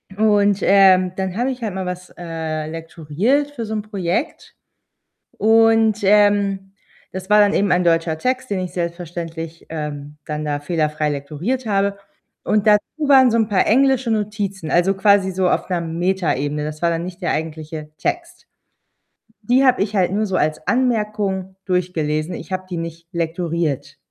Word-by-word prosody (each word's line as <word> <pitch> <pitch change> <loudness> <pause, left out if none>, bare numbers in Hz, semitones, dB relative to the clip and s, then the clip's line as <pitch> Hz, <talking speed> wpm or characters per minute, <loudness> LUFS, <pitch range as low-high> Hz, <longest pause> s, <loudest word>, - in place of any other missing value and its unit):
Und, 205 -2 +3
ähm, 185 -2 +5
dann 190 -1 -3
habe 250 +3 0
ich 250 -1 -7
halt 215 -4 -3
mal 190 -1 -3
was, 180 0 -6
äh, 160 -2 -4
lektoriert 165 - -1
für 235 -6 -5
so 220 - -5
'n 215 - -1
Projekt 200 - -3 0.8
und, 225 0 +4
ähm, 200 -1 +3 0.4
das 190 +2 -7
war 210 - +6
dann 205 0 +4
eben 200 -1 +1
ein 180 0 +2
deutscher 165 -1 +1
Text, 255 +1 -2
den 190 -2 -1
ich 180 -1 -5
selbstverständlich, 170 -2 -5
ähm, 150 -2 -6
dann 150 0 -4
da 145 -1 -2
fehlerfrei 155 -1 -1
lektoriert 155 - -3
habe, 200 -1 +1 0.5
und 210 0 0
dazu 210 -1 +5 0.3
waren 260 -3 +7
so 230 - +2
'n 220 -1 +1
paar 200 - +2
englische 260 0 +3
Notizen, 205 -5 -2
also, 175 +3 +3
quasi 200 -1 +3
so 185 0 0
auf - - 0
'ner 175 -1 0
Metaebene. 160 -4 -1
Das 155 +2 -6
war 170 - +3
dann 165 +1 -2
nicht 180 +1 -9
der - - 0
eigentliche 155 -1 -5
Text. 350 +1 -4 1.0
Die 250 +5 +3
habe 255 -5 +4
ich 210 +1 -1
halt 185 -1 +2
nur 210 +1 0
so 190 - -2
als 155 -1 -1
Anmerkung 210 -6 0
durchgelesen, 175 -3 -1
ich - - -10
habe 185 0 -3
die 175 - -4
nicht 165 0 -7
lektoriert. 165 -4 -2
185 Hz, 165 wpm, -20 LUFS, 165-210 Hz, 1.0 s, waren